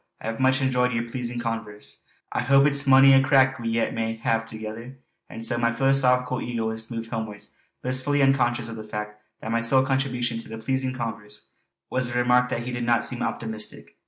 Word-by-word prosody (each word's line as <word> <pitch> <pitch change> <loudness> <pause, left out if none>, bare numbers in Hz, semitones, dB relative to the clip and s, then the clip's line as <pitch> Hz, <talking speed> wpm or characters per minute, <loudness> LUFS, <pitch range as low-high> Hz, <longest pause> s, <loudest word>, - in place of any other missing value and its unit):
I 115 - -3
hae 115 - -8
much 130 +1 +2
enjoyed 125 -1 +1
yer 115 0 -1
pleasin' 120 0 -4
converse. 115 -3 -6 0.3
I - - -1
hope 135 +2 +4
it's 140 -1 +3
mony 135 0 +7
a 135 - +6
crack 130 -1 +3
we 115 -1 -3
yet 115 0 0
may 115 0 -2
hae 115 0 0
thegither!" 115 +3 -8 0.3
And 115 - -7
so 120 -1 0
my 115 0 +2
philosophical 125 0 +2
egoist 110 -2 -4
moved 115 -1 -6
homewards, 110 -3 -6 0.3
blissfully 130 +3 +1
unconscious 120 -3 +2
of 115 -1 -7
the 110 - -7
fact 105 0 -7 0.2
that 110 - -5
my 115 0 +1
sole 130 +3 +3
contribution 125 -3 -1
to - - -10
the 110 - -7
"pleasing 130 +3 -2
converse" 105 -3 -6 0.5
was 130 -1 0
the 120 - -2
remark 125 0 +3
that 120 - -3
he 125 - -5
did 120 0 -3
not 120 -1 +2
seem 125 - 0
optimistic. 110 -2 -4
120 Hz, 200 wpm, -24 LUFS, 115-130 Hz, 0.5 s, mony